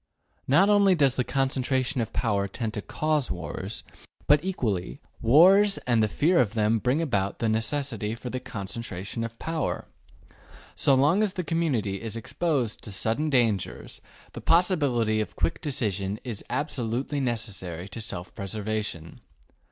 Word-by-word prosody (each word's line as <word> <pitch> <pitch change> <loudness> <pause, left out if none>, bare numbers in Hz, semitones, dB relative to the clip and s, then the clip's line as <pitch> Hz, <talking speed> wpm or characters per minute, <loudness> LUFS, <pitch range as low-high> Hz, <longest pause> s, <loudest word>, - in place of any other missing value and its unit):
Not 170 +9 +5
only 200 -2 +5
does 140 -5 +3
the 125 - +1
concentration 130 0 0
of 115 - -3
power 100 -4 0
tend 110 +1 -4
to 105 - -3
cause 155 +1 0
wars, 95 +4 -5 0.4
but, 150 +2 +4
equally, 110 - -2 0.2
wars 190 - +6
and 120 -3 +3
the 110 - +3
fear 165 - +2
of 115 -2 -1
them 110 +1 +2
bring 130 +8 +1
about 100 -10 -1
the 115 - -1
necessity 115 -1 -1
for 120 +1 -7
the 130 - -3
concentration 100 0 -5
of 115 0 -6
power. 160 -4 -2 0.9
So 135 - +5
long 150 +10 +4
as 210 -3 +1
the 180 - -3
community 135 - -1
is 115 -1 -4
exposed 130 -1 -1
to 105 - -6
sudden 115 +10 -1
dangers, 115 -8 0 0.3
the - - -7
possibility 145 - +2
of 105 - -5
quick 80 0 -1
decision 105 - -2
is 120 -6 -5
absolutely 135 -1 -2
necessary 100 -8 -3
to 115 - -6
self 90 -5 -5
preservation. 105 -4 -4
120 Hz, 150 wpm, -26 LUFS, 105-145 Hz, 0.9 s, wars